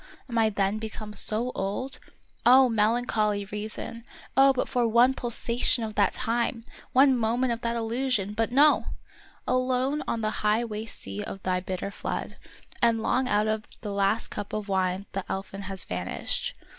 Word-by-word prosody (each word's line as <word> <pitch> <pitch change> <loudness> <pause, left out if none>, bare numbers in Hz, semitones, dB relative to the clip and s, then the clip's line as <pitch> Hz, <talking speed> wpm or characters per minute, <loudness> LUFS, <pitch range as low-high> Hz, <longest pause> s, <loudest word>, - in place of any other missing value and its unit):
Am 240 - -6
I 225 -1 +4
then 200 0 0
become 215 -1 -6
so 225 +4 +1
old? 205 +8 -3 0.4
Oh, 255 +1 +7
melancholy 215 -2 +1
reason! 215 +3 -6 0.3
Oh, 270 0 +7
but 265 - -1
for 245 -2 +1
one 240 +3 +5
pulsation 240 -1 +1
of 215 -1 -4
that 205 -2 +2
time! 235 -1 -1 0.3
one 265 +1 +5
moment 240 +2 +1
of 230 - -6
that 235 -1 -1
illusion! 230 -3 0
But 225 +2 0
no! 290 +4 +5 0.6
alone 255 +3 +1
on 230 - -1
the 215 0 0
high 215 +3 +2
waste 220 0 -5
sea 100 +1 -5
of 195 - -7
thy 185 -1 +1
bitter 185 +1 -4
flood - - -5 0.4
I 235 - +6
and 225 -1 +1
long 255 0 +1
out 210 +1 +2
of 215 0 -1 0.2
the 205 -3 -4
last 200 +2 +1
cup 205 -1 -6
of 215 -1 -3
wine 190 0 0
the 195 - -3
elfin 195 +1 -4
has 190 -3 -4
vanished 90 - -3
220 Hz, 170 wpm, -27 LUFS, 205-245 Hz, 0.6 s, Oh